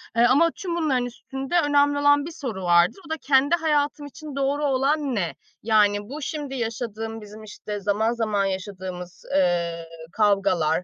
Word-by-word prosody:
eee, 235 - +4
ama 290 +7 +4
tüm 350 -3 -4
bunların 280 -7 +1
üstünde 270 +6 -3
önemli 285 -1 +3
olan 290 0 +4
bir 335 - -6
soru 250 - -5
vardır. 175 - +3
O - - -15
da, 320 - -2
"Kendi 280 +2 +3
hayatım 295 -3 0
için 290 0 -9
doğru 280 +2 0
olan 275 0 +1
ne?" 175 -6 -2 0.3
Yani, 205 -1 +2
"Bu 295 +3 -6
şimdi 290 -2 -4
yaşadığım 225 -2 -4
bizim, 210 +1 -11
işte, 210 0 -7
zaman 205 +3 +1
zaman 215 -4 0
yaşadığımız, 185 -2 -6
eee, 170 -3 +1 0.3
kavgalar, 195 -6 +2
235 Hz, 160 wpm, -24 LUFS, 200-290 Hz, 0.3 s, eee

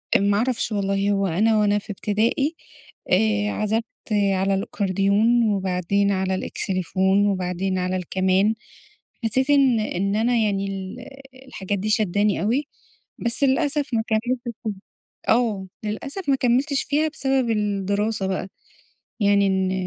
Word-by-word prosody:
أ - - +6
ما 200 0 +2
اعرفش 240 +1 0
والله، 200 -1 0
هو 195 -1 +1
أنا 215 +6 +2
وأنا 205 0 +2
في 205 - -19
ابتدائي، 225 - 0 0.6
آآ 210 +1 +2
عَزَفْت 215 +2 0 0.3
على 195 -2 +2
الأكورديون 200 +4 +1
وبعدين 195 +1 0
على 190 -1 0
الإكسليفون 190 +2 0
وبعدين 185 -1 -1
على 185 0 -1
الكَمان، 185 +3 +1 0.7
حسيت 260 +5 +1
إن 270 -5 +4
إن 200 -1 -1
أنا 235 +3 +2
يعني 200 -3 0
ال 195 +3 -6 0.5
الحاجات 200 -5 -3
دي 210 +3 -2
شادّاني 210 -1 +1
أوي، 250 +8 0 0.5
بس 235 +4 0
للأسف 285 +2 +1
ما 225 -1 +1
كمّلتش 240 +3 0 0.2
فيها 215 -3 -2 0.6
آه، 220 -5 +2 0.2
للأسف 280 - -4
ما 275 - +5
كمّلتش 265 +3 +1
فيها 300 +2 +1
بسبب 270 -5 0
الدراسة 205 -1 -1
بقى، 190 0 -2 0.7
يعني 200 -1 +4
إن 190 -1 +1
205 Hz, 135 wpm, -23 LUFS, 195-235 Hz, 0.7 s, أ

